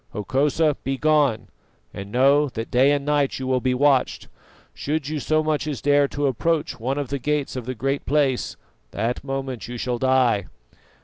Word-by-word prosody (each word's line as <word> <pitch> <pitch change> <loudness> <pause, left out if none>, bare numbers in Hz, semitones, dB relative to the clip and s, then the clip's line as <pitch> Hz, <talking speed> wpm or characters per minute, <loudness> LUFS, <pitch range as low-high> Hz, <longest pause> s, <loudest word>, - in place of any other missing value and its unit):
Hokosa, 140 +8 +1
begone, 135 -4 +1 0.4
and 100 +1 -8
know 140 +4 +4
that 115 -2 -6
day 130 +3 +4
and 145 -1 0
night 145 -2 +1
you 130 - -5
will 130 -1 0
be 130 0 +1
watched. 135 -1 +1 0.4
Should 150 -1 -3
you 155 -1 -2
so 155 +2 +1
much 155 -1 -1
as 145 -4 -3
dare 145 0 +3
to 145 +1 -3
approach 150 +4 -1
one 130 +5 -2
of 145 -3 -3
the 140 - -2
gates 150 +1 -1
of 125 -2 -6
the 130 - -3
Great 135 +4 -2
Place, 140 -3 0 0.3
that 115 - -3
moment 135 -4 -4
you 120 0 -6
shall 120 0 -2
die." 125 -6 +2
135 Hz, 180 wpm, -23 LUFS, 125-145 Hz, 0.4 s, know